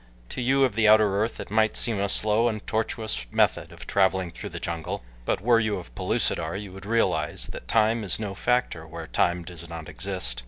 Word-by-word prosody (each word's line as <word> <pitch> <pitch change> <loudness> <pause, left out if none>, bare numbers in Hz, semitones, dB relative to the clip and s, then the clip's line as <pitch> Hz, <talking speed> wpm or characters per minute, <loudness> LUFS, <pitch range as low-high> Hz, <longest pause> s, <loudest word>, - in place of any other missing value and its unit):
To - - -4
you 135 +3 +3
of 130 - +2
the 110 -1 +3
outer 105 -2 +5
earth 110 - -2
it - - -7
might 110 0 +2
seem 115 -4 +2
a 100 0 0
slow 110 +4 +3
and 110 -2 -3
tortuous 110 - -2
method - - +1
of - - -11
traveling 95 -2 +1
through - - -7
the - - -7
jungle, 80 -5 -4 0.2
but - - 0
were 115 +1 +4
you 110 -2 0
of - - -10
Pellucidar 80 +6 -1
you 100 -2 -8
would 95 +1 -10
realize 115 +1 0
that - - -9
time 110 0 +3
is 95 0 -2
no 105 -3 -3
factor 120 -8 0
where 80 0 -7
time 85 +1 +1
does 85 -1 -10
not 80 -2 -7
exist. 90 -11 -3
100 Hz, 210 wpm, -26 LUFS, 85-110 Hz, 0.2 s, outer